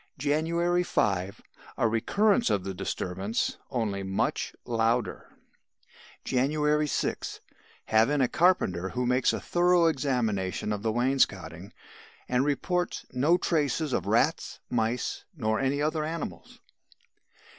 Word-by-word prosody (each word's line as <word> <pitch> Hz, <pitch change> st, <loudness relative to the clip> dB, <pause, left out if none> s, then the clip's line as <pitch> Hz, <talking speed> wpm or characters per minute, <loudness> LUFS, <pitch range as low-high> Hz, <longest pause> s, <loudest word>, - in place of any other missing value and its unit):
"January 165 Hz, +5 st, +1 dB
5. 95 Hz, -, -1 dB, 0.3 s
A 115 Hz, -, +3 dB
recurrence 205 Hz, -, +2 dB
of 95 Hz, -, +1 dB
the 95 Hz, 0 st, -4 dB
disturbance 95 Hz, +4 st, -2 dB
only 110 Hz, -6 st, -2 dB
much 95 Hz, 0 st, -2 dB
louder. 115 Hz, +1 st, 0 dB, 1.0 s
"January 150 Hz, +3 st, +1 dB
6. -, -, -2 dB, 0.5 s
Have 110 Hz, +3 st, +3 dB
in 145 Hz, 0 st, +1 dB
a 130 Hz, -, +3 dB
carpenter 110 Hz, -, +2 dB
who 125 Hz, +3 st, -2 dB
makes 125 Hz, +1 st, +3 dB
a -, -, -3 dB
thorough 175 Hz, 0 st, +3 dB
examination 120 Hz, -, 0 dB
of 105 Hz, -, -4 dB
the 110 Hz, +1 st, 0 dB
wainscoting 100 Hz, -8 st, 0 dB, 0.6 s
and 125 Hz, +1 st, +2 dB
reports 180 Hz, +5 st, -1 dB
'no 145 Hz, +8 st, +3 dB
traces 150 Hz, -4 st, 0 dB
of -, -, -1 dB
rats, -, -, +1 dB
mice 115 Hz, +1 st, -1 dB
nor 110 Hz, -4 st, 0 dB
any 140 Hz, +2 st, 0 dB
other 155 Hz, 0 st, 0 dB
animals. 155 Hz, -, -6 dB
125 Hz, 120 wpm, -28 LUFS, 110-155 Hz, 1.0 s, A